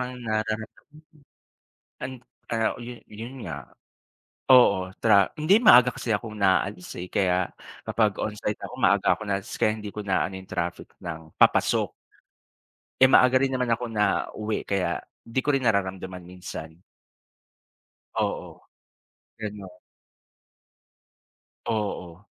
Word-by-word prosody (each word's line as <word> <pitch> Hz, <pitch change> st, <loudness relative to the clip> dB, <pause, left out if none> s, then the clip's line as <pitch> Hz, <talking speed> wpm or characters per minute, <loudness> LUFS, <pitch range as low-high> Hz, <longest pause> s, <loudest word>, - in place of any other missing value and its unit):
rang 125 Hz, 0 st, -5 dB
nararamdaman. 110 Hz, -1 st, -2 dB, 1.3 s
And, 130 Hz, +1 st, -4 dB, 0.3 s
ah, 115 Hz, -1 st, +1 dB
yun, 120 Hz, 0 st, -7 dB
yun 115 Hz, +4 st, -9 dB
nga, -, -, -7 dB, 0.8 s
oo, 100 Hz, -8 st, +6 dB
tra 100 Hz, -4 st, +4 dB
hindi 185 Hz, +8 st, +5 dB
maaga 125 Hz, -, +7 dB
kasi 115 Hz, -, -3 dB
akong 110 Hz, 0 st, -2 dB
naalis, 95 Hz, -1 st, +1 dB
eh, 90 Hz, -, -5 dB
kaya 90 Hz, -1 st, +1 dB, 0.4 s
kapag 110 Hz, -1 st, +2 dB
onsite 105 Hz, 0 st, -3 dB
ako -, -, -12 dB
maaga -, -, +4 dB
ako -, -, -18 dB
naalis 100 Hz, +2 st, -3 dB
kaya 105 Hz, -, +2 dB
hindi 105 Hz, -, -7 dB
ko 105 Hz, -, -4 dB
naano 95 Hz, -1 st, 0 dB
yung 95 Hz, 0 st, -10 dB
traffic 85 Hz, 0 st, -3 dB
ng 80 Hz, -2 st, -7 dB
papasok. -, -, +3 dB, 1.1 s
Eh, 130 Hz, -, +8 dB
maaga 130 Hz, -1 st, +6 dB
rin 135 Hz, 0 st, +1 dB
naman 125 Hz, -2 st, -1 dB
ako 115 Hz, +1 st, -1 dB
nauwi 105 Hz, 0 st, -1 dB
kaya 100 Hz, -2 st, 0 dB, 0.2 s
di 115 Hz, +3 st, -2 dB
ko 145 Hz, +2 st, +1 dB
rin 135 Hz, -2 st, 0 dB
nararamdaman 95 Hz, -4 st, -1 dB
minsan. 90 Hz, -2 st, -9 dB, 1.4 s
Oo, -, -, -3 dB, 0.8 s
gano'n. 100 Hz, -4 st, -7 dB, 1.9 s
Oo. 100 Hz, -5 st, -3 dB
105 Hz, 120 wpm, -26 LUFS, 95-115 Hz, 1.9 s, Eh